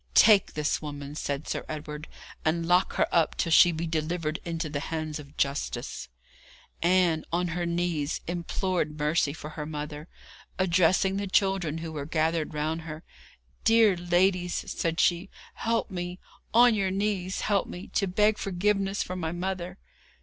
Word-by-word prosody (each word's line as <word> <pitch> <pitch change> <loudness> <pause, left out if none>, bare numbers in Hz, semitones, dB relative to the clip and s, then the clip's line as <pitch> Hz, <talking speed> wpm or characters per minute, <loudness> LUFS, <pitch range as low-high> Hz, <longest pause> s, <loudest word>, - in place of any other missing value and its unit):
'Take 210 -3 +6
this 150 0 0
woman,' 145 -1 -6
said 145 -1 -3
Sir - - -2
Edward, 150 0 -6 0.4
'and 165 +1 +1
lock 180 +2 +3
her - - +2
up 165 -2 +2
till 165 - 0
she 175 +2 +7
be 165 +1 -3
delivered 160 0 -2
into 165 -1 -3
the 145 -1 -3
hands 155 0 -4
of 145 0 -13
justice.' 140 - -2 0.7
Ann, 175 -2 +3
on 175 +1 0
her 175 +1 -2
knees, 170 -3 -1
implored 175 -2 -2
mercy 150 0 +1
for 150 0 -8
her 155 -1 -5
mother. 150 0 -6 0.5
Addressing 185 +1 +3
the 200 0 -2
children, 190 -5 +1
who 165 0 -5
were 145 -2 -5
gathered 160 0 0
round 155 +2 -1
her, 155 0 -8 0.6
'Dear 225 -3 +5
ladies,' 175 +1 +1
said 165 0 -1
she, 175 +2 +2 0.2
'help 230 -1 -1
me 180 -1 -4 0.3
on 240 +1 +6
your 195 -3 +1
knees 195 -1 -1
help 205 -2 +1
me 180 - -7
to 195 - 0
beg 210 +3 +2
forgiveness 195 +1 0
for 185 - -5
my 165 -3 -2
mother!' 180 +1 -4
170 Hz, 155 wpm, -27 LUFS, 155-185 Hz, 0.7 s, she